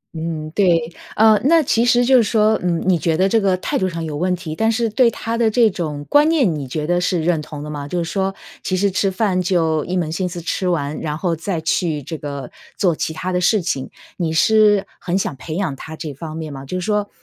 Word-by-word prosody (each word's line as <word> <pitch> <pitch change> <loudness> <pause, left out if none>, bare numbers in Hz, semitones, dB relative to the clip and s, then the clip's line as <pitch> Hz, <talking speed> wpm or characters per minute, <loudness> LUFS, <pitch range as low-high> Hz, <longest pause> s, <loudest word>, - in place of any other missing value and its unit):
嗯， 160 -1 -4
对。 175 -2 +3 0.4
呃， 215 -1 +5
那 320 +4 +5
其 230 -4 +2
实 245 0 +4
就 260 +1 +6
是 - - +6
说， 215 0 +2
嗯， 175 -2 0
你 180 -3 +3
觉 160 0 0
得 190 +2 +3
这 225 +3 +2
个 190 -2 +2
态 - - -2
度 190 - 0
上 165 -2 -5
有 155 -2 -4
问 180 +4 0
题， 165 -3 -6
但 225 +5 +2
是 230 +1 0
对 235 +3 +3
他 230 0 -4
的 230 -2 +3
这 225 -1 +3
种 150 -5 -4
观 295 +2 +4
念 275 - +2
你 140 -3 -5
觉 150 +4 -3
得 175 +2 +1
是 180 -2 0
认 165 -2 +1
同 150 -1 -8
的 150 - -7
吗？ 145 -1 -5
就 175 +3 -2
是 165 - -5
说 195 -1 -1 0.3
其 185 - -1
实 200 +1 +1
吃 195 +1 +1
饭 190 -1 0
就 165 -4 +1
一 185 +1 -2
门 165 -3 -1
心 180 +2 -2
思 175 0 -6
吃 180 +2 -2
完， 150 -4 -1
然 150 -2 -3
后 170 0 -1
再 165 +2 -3
去 160 -2 -1
这 160 - -6
个 140 -3 -6 0.3
做 175 -4 +2
其 160 - -2
它 180 +3 -4
的 180 0 0
事 205 +3 +3
情。 135 -6 -2 0.3
你 170 -3 -1
是 210 +4 +4
很 180 +1 -1
想 185 - -2
培 155 +4 -7
养 180 -6 -1
他 160 +3 -9
这 155 -2 -6
方 155 +3 -7
面 155 -2 -6
吗？ 135 -1 -8
就 185 +7 -4
是 180 - -4
说 210 -1 0
180 Hz, 270 characters per minute, -19 LUFS, 160-205 Hz, 0.4 s, 就